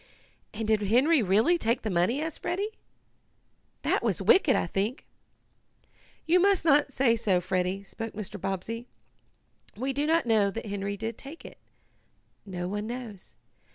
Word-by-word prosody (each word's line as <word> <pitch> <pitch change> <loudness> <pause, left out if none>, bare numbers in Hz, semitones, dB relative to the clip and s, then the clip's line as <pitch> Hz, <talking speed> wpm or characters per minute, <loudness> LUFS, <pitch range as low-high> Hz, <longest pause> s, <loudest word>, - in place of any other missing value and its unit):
"And 220 0 -4
did 215 -1 +2
Henry 255 +9 +4
really 220 - +3
take 235 -1 0
the 215 - -2
money?" 180 +10 +1
asked 320 -1 -5
Freddie. 400 +5 -2 1.1
"That - - +1
was - - 0
wicked, 325 -8 +4
I - - +1
think." 200 - -2 1.2
"You 345 +3 +4
must 390 -2 +3
not 290 -2 +4
say 255 -3 +3
so, 200 -5 +1
Freddie," 185 +2 -1
spoke 225 +2 -7
Mr. 205 -2 -7
Bobbsey. 195 +5 -4 0.9
"We 265 +4 -2
do 290 +3 0
not 325 -1 +2
know 215 -4 +3
that 225 +3 -6
Henry 200 -1 -3
did 225 +2 -5
take 285 +5 -10
it. - - -12 0.9
No 180 -2 -4
one 205 +3 -3
knows. 235 -5 -8
225 Hz, 155 wpm, -28 LUFS, 200-275 Hz, 1.2 s, Henry